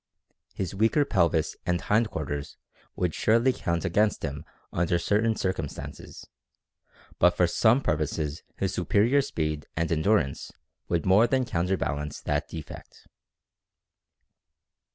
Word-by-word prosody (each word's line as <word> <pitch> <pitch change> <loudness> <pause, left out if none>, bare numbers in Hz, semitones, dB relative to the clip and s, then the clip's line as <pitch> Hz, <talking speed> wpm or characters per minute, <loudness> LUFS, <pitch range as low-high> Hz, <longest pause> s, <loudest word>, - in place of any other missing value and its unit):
His 95 -2 -3
weaker 115 +9 +2
pelvis 85 - +1
and 90 0 0
hind 110 +5 +1
quarters 75 -4 -5 0.4
would 90 -3 -1
surely 115 +4 +3
count 85 -4 -2
against 105 +4 +1
him 70 +1 -4 0.3
under 85 0 +1
certain 110 +5 +1
circumstances, 95 -8 -5 0.9
but 90 0 +4
for 90 - +5
some 110 +9 +3
purposes 75 - -2 0.2
his 95 0 -1
superior 105 - +3
speed 75 - -3
and 80 +1 0
endurance 80 -3 +1 0.4
would 85 -2 0
more 100 +5 +5
than 130 +1 +1
counterbalance 85 - -2
that 75 +1 -1
defect. 80 -3 -10
90 Hz, 115 wpm, -27 LUFS, 80-105 Hz, 0.9 s, for